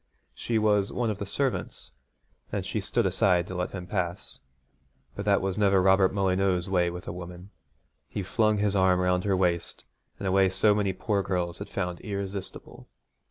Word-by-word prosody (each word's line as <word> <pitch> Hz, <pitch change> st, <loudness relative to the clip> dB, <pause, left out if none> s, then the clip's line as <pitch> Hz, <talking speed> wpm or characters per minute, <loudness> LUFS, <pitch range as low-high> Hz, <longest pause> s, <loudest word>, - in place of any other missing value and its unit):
She 115 Hz, -, -2 dB
was 105 Hz, -2 st, +2 dB
one 120 Hz, -3 st, -1 dB
of 100 Hz, -, -6 dB
the 100 Hz, -, -4 dB
servants, 135 Hz, +5 st, -2 dB, 0.6 s
and -, -, -2 dB
she -, -, -2 dB
stood -, -, 0 dB
aside 90 Hz, -3 st, +2 dB
to 95 Hz, -, -8 dB
let 90 Hz, 0 st, -2 dB
him 90 Hz, -2 st, -7 dB
pass, 90 Hz, -1 st, -4 dB, 0.8 s
but 100 Hz, -, -5 dB
that 100 Hz, -2 st, +3 dB
was 95 Hz, +1 st, -2 dB
never 100 Hz, -2 st, +4 dB
Robert 95 Hz, 0 st, +4 dB
Molyneux's 95 Hz, -2 st, +1 dB
way 90 Hz, -2 st, +2 dB
with 90 Hz, +1 st, -8 dB
a -, -, -3 dB
woman. 90 Hz, +2 st, -9 dB, 0.6 s
He 100 Hz, -, -4 dB
flung 110 Hz, +2 st, +1 dB
his 100 Hz, -1 st, +1 dB
arm 95 Hz, -1 st, +3 dB
round 90 Hz, 0 st, +1 dB
her 95 Hz, -2 st, +2 dB
waist 85 Hz, -2 st, -1 dB, 0.3 s
in -, -, -5 dB
a 95 Hz, -, +1 dB
way 95 Hz, 0 st, +4 dB
so 95 Hz, +3 st, +3 dB
many 105 Hz, -2 st, +1 dB
poor 100 Hz, +2 st, -1 dB
girls 90 Hz, -3 st, -2 dB
had -, -, -7 dB
found 90 Hz, -1 st, -3 dB
irresistible. 100 Hz, -1 st, -6 dB
95 Hz, 185 wpm, -27 LUFS, 90-100 Hz, 0.8 s, never